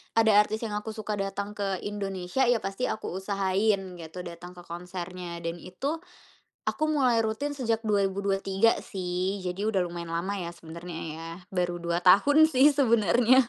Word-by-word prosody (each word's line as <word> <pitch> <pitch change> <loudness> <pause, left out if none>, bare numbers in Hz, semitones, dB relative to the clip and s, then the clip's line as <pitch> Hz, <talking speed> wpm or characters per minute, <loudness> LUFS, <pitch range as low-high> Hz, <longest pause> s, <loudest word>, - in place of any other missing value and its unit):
ada 225 -1 +5
artis 215 +1 +2
yang 220 - -3
aku 220 +1 -6
suka 215 -1 -3
datang 195 +1 -3
ke 195 -3 -1
Indonesia, 195 +2 -2
ya 240 -1 +4
pasti 195 +5 -2
aku 215 - -3
usahain 195 -1 0
gitu 165 +2 -8
datang 175 0 -8
ke 175 - -10
konsernya, 175 0 -6
dan 165 0 -2
itu, 275 - -3 0.7
aku 310 - 0
mulai 255 -6 +3
rutin 220 +7 -1
sejak 230 -5 -1
2023 195 +1 +2
sih, 185 +1 -2
jadi 185 +3 -2
udah 195 - +1
lumayan 170 -1 -6
lama 190 +4 -1
ya 170 -2 -4
sebenernya 170 0 -8
ya. 165 +1 -7 0.2
Baru 175 -2 -1
2 170 0 0
tahun 290 - +7
sih 285 -1 +5
sebenernya. 240 0 +5
195 Hz, 160 wpm, -28 LUFS, 180-220 Hz, 0.7 s, tahun